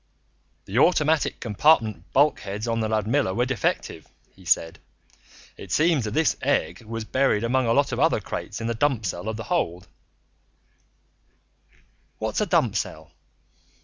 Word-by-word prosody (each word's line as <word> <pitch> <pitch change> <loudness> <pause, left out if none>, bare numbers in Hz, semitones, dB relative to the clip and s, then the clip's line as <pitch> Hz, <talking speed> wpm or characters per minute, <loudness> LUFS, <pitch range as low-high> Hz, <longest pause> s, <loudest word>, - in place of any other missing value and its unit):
"The 105 +6 -1
automatic 155 -1 +2
compartment 110 - +2
bulkheads 110 -7 +1
on 115 0 0
the 110 -1 -1
Ludmilla 110 0 0
were 120 - +1
defective," 130 -4 -2 0.3
he 95 - -18
said. 80 -1 +1 0.8
"It - - -10
seems 155 -6 +2
that 105 - -4
this 160 0 +2
egg 140 -2 0
was 115 0 -6
buried 130 -4 +1
among 125 +1 +1
a 115 - +3
lot 140 +2 +2
of 120 - -3
other 160 -4 +3
crates 105 - -6
in 115 - -5
the 115 - -1
dump 120 -2 0
cell 90 +3 -3
of 110 - -4
the 115 - -5
hold 90 - -2 0.8
" - - -39
"What's - - -2
a - - 0
dump - - +2
cell?" 80 0 -4
115 Hz, 155 wpm, -24 LUFS, 105-140 Hz, 0.8 s, a